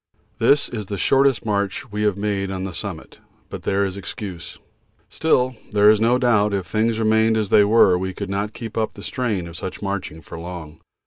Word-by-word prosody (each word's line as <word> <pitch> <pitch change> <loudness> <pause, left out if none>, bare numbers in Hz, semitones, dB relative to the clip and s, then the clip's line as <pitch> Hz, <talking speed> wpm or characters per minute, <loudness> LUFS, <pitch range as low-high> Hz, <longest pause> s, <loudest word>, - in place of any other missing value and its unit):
This 145 0 +4
is 105 -4 -6
the 100 - -4
shortest 135 -1 +3
march 100 -2 -2
we 105 +1 -3
have 105 -2 +1
made 100 -1 -1
on 95 -1 -4
the 95 -2 -5
summit, - - -7 0.3
but - - -7
there 100 +1 +1
is 95 0 -4
excuse. 100 -3 -7 0.5
Still, 130 -5 +1 0.2
there 105 0 +6
is 110 0 +2
no 120 +2 +4
doubt 105 -5 +2
if 95 -2 -2
things 110 +5 0
remained 110 0 +3
as 105 -3 -1
they - - +6
are 100 -3 +5
we 95 0 -2
could 100 +2 -6
not 100 +2 -2
keep 115 -1 -5
up 110 - -1
the 100 - -11
strain 110 -9 -2
of 85 - -10
such 95 +4 -6
marching 95 -5 -4
for 80 - -9
long. 85 -3 -8
105 Hz, 205 wpm, -22 LUFS, 95-110 Hz, 0.5 s, there